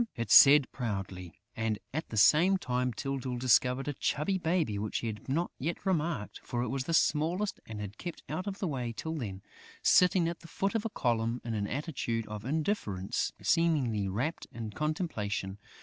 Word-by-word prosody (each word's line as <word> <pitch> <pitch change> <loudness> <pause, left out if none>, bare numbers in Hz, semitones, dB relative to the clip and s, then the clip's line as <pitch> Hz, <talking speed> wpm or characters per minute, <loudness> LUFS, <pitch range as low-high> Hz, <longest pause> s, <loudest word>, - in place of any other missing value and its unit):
it 115 -3 -3
said 145 0 +9
proudly. 95 -7 -4 0.2
And, 110 -1 -1 0.2
at 160 +3 -3
the 110 - -5
same 170 - +6
time, 125 -6 -1
Tyltyl 130 +1 -3
discovered 125 +2 +3
a 145 - -1
chubby 170 +8 0
baby 160 - 0
which 105 0 -2
he - - -4
had 110 +2 -5
not 165 +6 0
yet 165 +9 -3
remarked, 165 - -1
for 120 0 -2
it - - -3
was 135 0 -2
the 165 - -2
smallest 170 +8 +1
and 110 -2 -6
had 105 0 -7
kept 175 -2 -6
out 185 +6 -4
of 195 -1 -3
the 195 - -2
way 125 -6 -3
till 160 - -3
then, 100 -11 -5 0.4
sitting 180 -2 +5
at 170 0 -4
the 165 - -13
foot 195 +4 -1
of 225 -1 -1
a - - 0
column 120 - 0
in 115 - -2
an 105 -2 -1
attitude 130 -5 -2
of 105 0 -7
indifference, 135 - -1
seemingly 135 -12 +2
rapt 125 - -2
in 110 -2 -6
contemplation. 105 - -2
130 Hz, 185 wpm, -31 LUFS, 110-165 Hz, 0.4 s, said